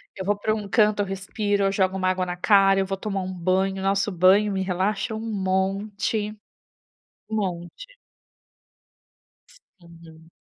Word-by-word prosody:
eu 190 - -6
vou 205 +1 +1
pra 215 +1 0
um 210 -2 -5
canto, 210 0 +3
eu - - 0
respiro, 200 +1 -1
eu 195 - +2
jogo 190 -1 0
uma 185 -1 +1
água 185 0 0
na 180 0 -5
cara, 195 0 +4
eu 190 - +1
vou 195 0 -3
tomar 195 -1 -3
um 185 0 -5
banho, 190 +2 0
nossa, 195 +1 +1
banho 195 +3 +4
me 190 - -1
relaxa 195 +4 -1
um 220 - -5
monte, 200 +1 -1 1.0
um 220 - -3
monte. 190 - -5 1.5
Sim. 170 - -18
195 Hz, 155 wpm, -24 LUFS, 185-205 Hz, 1.5 s, cara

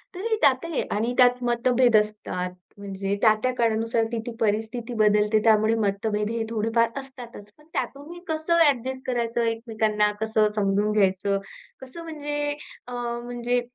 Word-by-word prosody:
तरी 440 +4 -1
त्यातही 280 +4 +2
आणि 225 +4 0
त्यात 250 0 +4
मतभेद 245 0 +2
असतात. 210 -4 -2 0.3
म्हणजे 195 0 -3
त्या-त्या 220 +3 +3
काळानुसार 230 -1 +1
ती-ती 230 +1 -4
परिस्थिती 225 +2 -1
बदलते, 210 -1 +3
त्यामुळे 220 0 +4
मतभेद 210 +1 -1
हे 230 0 -2
थोडेफार 225 +1 +1
असतातच. 245 -6 -11
पण 300 - -21
त्यातून 280 +1 -4
मी 345 +1 -9
कसं 320 +1 -1
ॲडजस्ट 260 -1 -1
करायचं, 235 -2 -1
एकमेकांना 220 -2 0
कसं 220 -1 +2
समजून 205 0 +1
घ्यायचं, 200 -1 +2 0.4
कसं 265 +6 -9
म्हणजे 295 -2 -3 0.4
अ, 250 - -7 0.3
म्हणजे 245 0 -1
230 Hz, 135 wpm, -25 LUFS, 210-255 Hz, 0.4 s, त्यात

